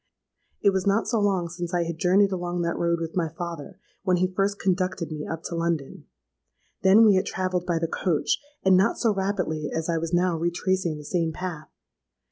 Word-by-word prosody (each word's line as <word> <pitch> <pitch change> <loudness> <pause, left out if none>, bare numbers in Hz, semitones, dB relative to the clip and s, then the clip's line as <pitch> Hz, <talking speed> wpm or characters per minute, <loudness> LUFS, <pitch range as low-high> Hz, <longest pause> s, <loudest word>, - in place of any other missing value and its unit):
It 200 - +6
was 190 0 -1
not 200 +3 +2
so 225 0 +1
long 195 -4 +1
since 175 +1 -4
I 175 - +2
had 165 -1 -5
journeyed 195 +2 +4
along 175 -1 -2
that 170 0 -1
road 170 0 0
with 165 -1 -5
my 170 -3 0
father—when 170 +3 -4
he 185 +1 0
first 200 +1 0
conducted 185 -3 -1
me 150 -1 -5
up 165 0 -5
to 170 - -4
London. 165 -4 -2 0.7
Then 200 +4 +7
we 210 - +6
had 185 - 0
travelled 185 -1 -2
by 170 -2 +1
the 165 0 -1
coach, 165 -2 0 0.2
and 190 -1 +5
not 190 +2 +3
so 225 -3 +2
rapidly 190 -6 -2
as 160 +1 -3
I 165 -1 +1
was 165 0 -4
now 175 0 +2
retracing 175 0 0
the 150 - -10
same 165 0 0
path. 165 -3 -6
175 Hz, 200 wpm, -25 LUFS, 165-190 Hz, 0.7 s, Then